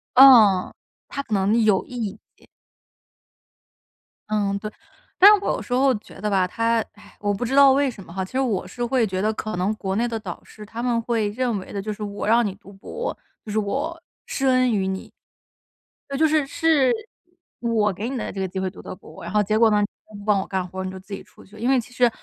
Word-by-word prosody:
嗯， 230 -8 +7 0.3
他 280 - -4
可 225 - -6
能 205 +4 +2
有 205 -3 +3
一 220 -4 -5 0.2
点。 - - -24 1.8
嗯， 205 -2 0
对， 215 +1 -6 0.5
但 395 - +9
是 420 - +5
我 - - +1
有 - - -2
时 245 - -5
候 265 +1 +4
觉 210 - -11
得 210 - -1
吧， 190 -2 +2
他， 230 +4 +1
唉， 205 -1 -18
我 205 -1 0
不 200 - -3
知 255 +3 -1
道 280 -1 +8
为 275 0 +2
什 215 - -12
么 170 - -14
哈， 190 +1 -2
其 185 - -9
实 260 - -1
我 225 -9 0
是 240 +6 -5
会 240 -1 +2
觉 185 -2 -2
得 215 +2 +1
可 215 -2 -4
能 185 +4 0
国 190 -2 -3
内 235 +2 +1
的 230 -1 -3
导 185 -5 -7
师 215 - -12
他 225 +3 -7
们 240 -2 +1
会 230 -2 0
认 235 -1 -1
为 185 - -10
的， 200 - -3
就 215 - -4
是 210 - -8
我 205 -1 -4
让 230 +2 +4
你 195 -2 -3
读 200 0 -16
博， 465 - -6 0.3
就 215 - -6
是 215 - +1
我 285 +11 -3 0.2
施 270 - -1
恩 255 -1 +3
于 195 -3 0
你。 190 0 -5 1.0
那 275 - -3
就 320 - +4
是， 310 -2 +2
是 315 -4 +3 0.7
我 225 -3 +1
给 215 +6 -4
你 265 - -3
的 230 - -4
这 195 - -7
个 190 - -1
机 190 +1 -5
会 190 0 -1
读 185 - -12
的 - - -8
博， 160 -3 -14
然 - - -6
后 210 0 +3
结 215 +2 0
果 225 -1 +6
呢 210 0 +3
你 205 - +1 0.3
不 200 - -10
帮 210 -2 +3
我 - - -7
干 190 -2 -2
活， 190 +1 -6
你 185 - -4
就 190 - -8
自 195 +2 -11
己 195 - -5
出 - - -19
去。 205 +2 -16
因 235 +4 -1
为 265 -1 +4
其 220 - -16
实 245 -1 +4
215 Hz, 265 characters per minute, -23 LUFS, 195-250 Hz, 1.8 s, 但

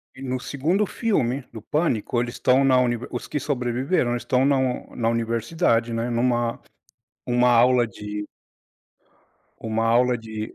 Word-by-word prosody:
e 130 - -12
no 130 -1 -3
2º 160 +11 0
filme 140 - -1
do 110 - -8
Pânico, 125 -4 0
eles 120 0 -4
estão 130 +2 +3
na 130 -2 +4
univer 120 -1 0
os 120 - -5
que 150 - -2
sobreviveram, 125 +1 -1
eles 120 - -2
estão 130 +1 +2
na 140 -1 +3
un 130 -1 -2
na 115 -1 0
universidade, 115 +2 0
né, 115 +1 -2
numa 120 0 0 0.7
uma 125 0 +3
aula 120 0 +4
de 105 0 -7 1.3
uma 115 -1 -1
aula 125 +2 +3
de 110 -1 -7
120 Hz, 155 wpm, -23 LUFS, 115-130 Hz, 1.3 s, na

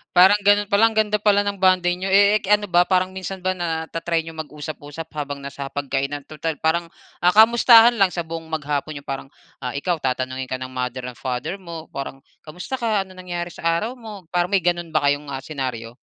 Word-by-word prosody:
Parang 190 +3 +7
ganoon 205 0 +4
pa 200 - +4
lang 225 0 +5
ganda 210 -1 +2
pala 205 -1 +3
ng 200 -1 -3
bonding 180 -1 +3
niyo. 195 - -1
Eh 200 +2 +5
k 200 - -4
ano 205 0 -5
ba 175 +1 +4
parang 185 0 +2
minsan 190 0 -6
ba 185 - +1
na 165 -2 -2
ta-try 165 -1 -1
niyo 165 - -8
mag-usap-usap 150 0 -7
habang 145 -1 -4
na 140 - -6
sa 140 0 -6
hapag-kainan? 140 0 -3
Tutal 155 +1 -4
parang, 170 +2 +1 0.4
ah, 180 - +6
kamustahan 235 +1 +7
lang 190 -2 +4
sa 170 - -2
buong 165 0 -7
maghapon 150 -1 -3
niyo. 140 - -8
Parang, 135 0 -4 0.3
ah, 125 -1 -5
ikaw 165 +3 -1
tatanungin 130 0 -2
ka 130 - 0
ng 130 0 -7
Mother 125 0 -4
and 120 - -19
Father 130 +9 -3
mo 170 -3 -9
parang 135 -1 -6 0.2
kamusta 180 - -6
ka? 220 -4 +1
Anong 185 -1 -15
nangyari 175 -1 -4
sa - - -12
araw 170 +8 0
mo? 210 -5 -9
Parang 175 0 +1
may 195 -3 +2
ganoon 175 -1 0
ba - - +1
kayong, 145 +1 0
ah, 135 0 -5
senaryo? 125 -6 -5
165 Hz, 215 wpm, -22 LUFS, 145-190 Hz, 0.4 s, Parang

